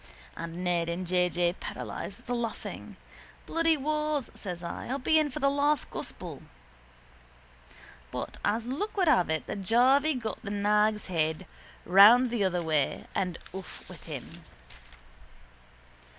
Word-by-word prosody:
And 170 +2 -6
Ned 170 -2 +1
and 175 +2 -3
J. 180 0 +2
J. 175 0 +1
paralysed - - -6
with - - -20
the 245 - -2
laughing. 235 -2 -5 0.5
—Bloody 330 -1 +2
wars, 300 -1 -1
says 180 -3 -6
I, 170 - -5
I'll 265 - -1
be 315 +4 +3
in 305 -1 +1
for 275 - -7
the 275 -2 +2
last 285 0 +1
gospel. - - -6 1.7
But - - -5
as 220 +3 0
luck 350 - -3
would 370 -3 +3
have 245 - +4
it 160 -1 -1
the - - -4
jarvey 255 +9 +3
got 225 -3 -4
the 200 - -6
nag's 210 +1 +2
head 160 0 -1 0.4
round 220 +7 +7
the 235 -4 0
other 180 -2 0
way 155 -3 0
and 180 -3 -1 0.2
off 190 -1 -9
with - - -12
him. - - -8
210 Hz, 150 wpm, -29 LUFS, 180-275 Hz, 1.7 s, round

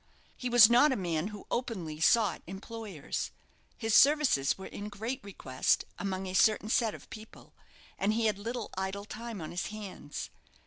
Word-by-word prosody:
He 250 - -4
was 240 -3 +9
not 245 +6 +5
a - - +1
man 175 -3 -1
who 210 -2 -9
openly 185 -11 -3
sought 210 +4 +3
employers. 195 -3 -5 0.5
His 225 -2 -1
services 280 - +5
were 190 - -8
in 205 +1 -7
great 220 +5 -5
request 130 -10 0
among 190 -1 -3
a 185 - -5
certain 215 +2 +3
set 225 -2 +2
of - - -13
people, 220 0 -12 0.5
and 205 +2 +2
he 230 0 +1
had 210 -2 +1
little 230 +2 -4
idle 190 +2 -3
time 225 -2 -7
on 155 - -6
his 175 - -3
hands. 205 -8 -7
210 Hz, 170 wpm, -31 LUFS, 190-230 Hz, 0.5 s, was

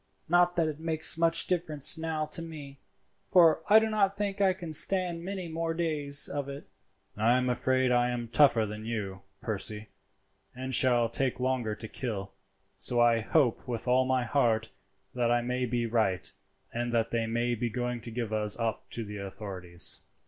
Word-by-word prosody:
Not 175 +1 +3
that 165 -2 +1
it 155 -1 -5
makes 160 -1 +3
much 165 0 +2
difference 160 -6 +2
now 160 -1 -3
to 155 +2 -4
me, 145 -4 -9 0.5
for 165 -3 +5
I 210 +2 +7
do 220 0 +4
not 200 -2 +1
think 200 -1 -2
I 195 -1 +4
can 175 -3 -6
stand 175 0 +2
many 190 -1 -5
more 165 0 -3
days 150 -4 +3
of 140 -1 -4
it." 140 +1 -8 0.5
"I 115 +4 +3
am 125 0 0
afraid 130 +1 +1
I 120 0 +2
am 120 -1 -4
tougher 120 -2 +4
than 105 +1 -7
you, 105 -4 -5 0.2
Percy, 105 0 -4 0.7
and 130 +1 -5
shall 120 -2 +3
take 125 +2 -1
longer 125 -4 -1
to 110 - -7
kill, 105 -5 -5 0.4
so 120 - -1
I 120 -1 +4
hope 125 +2 +1
with 120 0 -4
all 130 +1 +3
my 130 -1 +1
heart 115 -2 +1 0.4
that 120 -2 0
I 120 0 +2
may 125 +1 -2
be 120 0 -1
right, 110 -5 0 0.4
and 120 0 -2
that 115 -1 0
they 115 -1 -1
may 120 +2 -1
be 120 +1 -2
going 125 +1 -3
to 120 - -4
give 115 -1 -4
us 105 -1 +1
up 110 -4 -3
to 115 - -3
the 105 0 -7
authorities." 95 -3 -3
125 Hz, 185 wpm, -29 LUFS, 115-160 Hz, 0.7 s, I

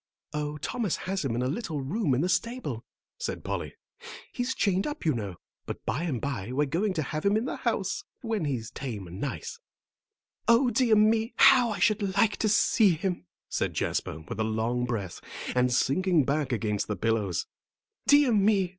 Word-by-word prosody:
"Oh, 150 0 -2
Thomas 205 - -1
has 190 -1 -1
him 125 -5 -1
in 120 - 0
a - - +1
little 160 - -3
room 145 - 0
in 130 - +1
the 175 - +1
stable," 230 - -1 0.4
said 480 - -4
Polly. - - -4 0.6
"He's 245 +1 -2
chained 195 +1 +1
up, 295 - -5
you 155 - +3
know. 100 -6 -4 0.3
But - - -6
by 145 +10 -1
and 140 -8 -1
by 125 -6 -3
we're 145 +3 +1
going 185 +8 0
to 155 - 0
have 155 +3 -4
him 200 +1 +3
in 225 - -1
the - - -3
house, - - -1 0.2
when 220 -7 -1
he's 125 -5 -3
tame 110 -9 -5
and 90 +3 -9
nice." 145 - -4 0.9
"O 240 +2 +5
dear 235 -1 +4
me! 220 +2 +3
How 245 -2 +7
I 210 - -2
should 205 -4 +1
like 210 0 +3
to 215 - +1
see 205 -1 +4
him," 175 - -3 0.2
said - - -2
Jasper, 80 - -2
with 80 - -7
a - - +2
long 110 +3 0
breath, 100 -7 -4 0.3
and 125 0 +3
sinking 160 +6 +3
back 140 0 0
against 105 -3 -1
the 105 - -2
pillows. 105 -3 0 0.6
"Dear 285 -2 +6
me! 200 -3 +3
155 Hz, 190 wpm, -28 LUFS, -, 0.9 s, How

